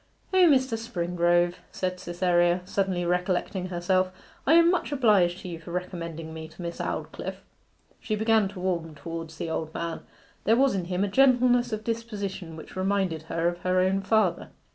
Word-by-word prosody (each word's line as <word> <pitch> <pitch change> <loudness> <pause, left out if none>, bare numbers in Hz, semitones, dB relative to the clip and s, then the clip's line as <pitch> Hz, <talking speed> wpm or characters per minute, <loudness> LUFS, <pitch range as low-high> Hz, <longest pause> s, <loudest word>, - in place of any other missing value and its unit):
'O, 370 -2 +6
Mr. 260 -4 +3
Springrove,' 175 -5 +1
said 185 -1 -3
Cytherea, 175 0 +2
suddenly 190 -2 -1
recollecting 180 +1 -1
herself; 185 +1 +1 0.4
'I 300 - +6
am 335 0 +6
much 360 -4 -1
obliged 205 -10 +3
to - - -8
you 170 -2 -6
for 165 - -12
recommending 170 -3 -5
me 160 0 -7
to 160 - -13
Miss 170 0 -5
Aldclyffe.' - - -5 0.6
She 215 - -2
began 220 -1 +3
to 195 -1 -9
warm 170 -4 -2
towards 165 +1 -7
the 165 - -4
old 160 -1 -3
man; 170 -1 -3 0.4
there 225 +3 +4
was 270 +1 +4
in 185 -3 -2
him 180 +2 -1
a - - +1
gentleness 245 +1 +4
of 215 0 -3
disposition 205 -7 -4
which 160 - -11
reminded 190 -4 0
her 165 0 0
of 175 0 -2
her 185 +1 +1
own 190 +1 +2
father. 200 -2 +1
185 Hz, 175 wpm, -27 LUFS, 175-215 Hz, 0.6 s, O